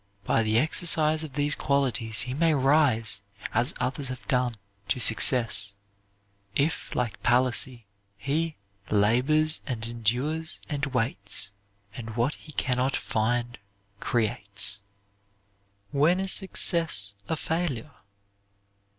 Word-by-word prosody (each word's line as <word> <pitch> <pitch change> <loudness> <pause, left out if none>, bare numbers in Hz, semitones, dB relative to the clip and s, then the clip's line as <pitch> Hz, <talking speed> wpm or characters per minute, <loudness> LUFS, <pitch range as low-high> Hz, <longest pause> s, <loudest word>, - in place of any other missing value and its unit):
By 115 - +1
the 110 0 +1
exercise 155 +2 +4
of 150 -4 -8
these 145 +1 0
qualities 120 -7 0
he 125 0 -3
may 160 +2 +2
rise, 130 -7 +2 0.3
as 120 +3 +1
others 130 +2 -2
have 130 0 -8
done, 125 -3 0 0.3
to 125 - -1
success, 110 -3 +3 0.8
if 150 +3 -1
like 120 -4 -3
Palissy 125 -1 +3 0.3
he 155 +8 -2 0.3
"Labors 130 +10 +2
and 115 -5 -4
endures 125 +8 -2
and 145 -1 -3
waits 115 -6 -1 0.4
And 110 -2 -8
what 120 +5 0
he 155 - -12
can 125 -2 -1
not 130 +2 0
find 120 +2 -2 0.4
creates." 100 -3 -2 1.1
WHEN 155 +6 +2
IS 190 0 0
SUCCESS 165 - +2 0.2
A - - 0
FAILURE? 155 -5 -3
125 Hz, 115 wpm, -26 LUFS, 115-150 Hz, 1.1 s, exercise